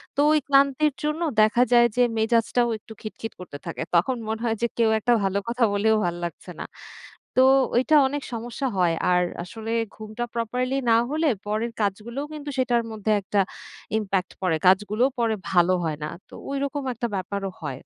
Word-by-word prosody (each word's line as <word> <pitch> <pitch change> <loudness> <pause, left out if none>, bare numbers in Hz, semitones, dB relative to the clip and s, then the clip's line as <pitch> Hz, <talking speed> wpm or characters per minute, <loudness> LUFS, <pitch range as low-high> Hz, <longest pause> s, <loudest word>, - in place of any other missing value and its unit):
তো - - -4
ওই 305 - +4
ক্লান্তির 280 +1 +3
জন্য 300 +2 -1 0.2
দেখা 215 +3 +4
যায় 240 0 +7
যে, 245 - +5
মেজাজটাও 230 +2 +2
একটু 220 - -13
খিটখিট 225 0 -7
করতে 165 -6 -8
থাকে। - - -5
তখন 245 +9 +2
মনে 220 +1 -3
হয় 225 -1 0
যে, 235 - +4
কেউ 230 -2 +3
একটা 240 +3 +2
ভালো 195 +1 0
কথা 240 +1 0
বললেও 220 +2 +3
ভাল 175 0 -1
লাগছে 170 +2 -8
না। - - -4 0.7
তো, 260 - +7 0.3
ওইটা 260 +6 +3
অনেক 285 +1 -4
সমস্যা 240 +4 -3
হয়। 175 -2 +3 0.2
আর 180 0 +4 0.2
আসলে 225 +4 -7 0.2
ঘুমটা 215 +2 -5
properly 250 +3 -1
না 225 - +6
হলে, 310 0 +2 0.2
পরের 220 +3 -1
কাজগুলোও 220 +7 -2
কিন্তু 295 -1 -6
সেটার 245 -2 +2
মধ্যে 215 0 -2
একটা 200 +1 +1 0.6
impact 195 -3 -2
পড়ে। 180 -4 +1
কাজগুলোও 210 +7 +3
পরে 230 -2 +1 0.2
ভালো 180 0 +4
হয় 155 -2 -2
না। 150 - -3 0.2
তো, - - -18 0.2
ঐরকম 280 +1 -2
একটা 235 +1 -3
ব্যাপারও 195 +1 -3
হয়। 145 -4 -4
225 Hz, 180 wpm, -24 LUFS, 195-255 Hz, 0.7 s, যায়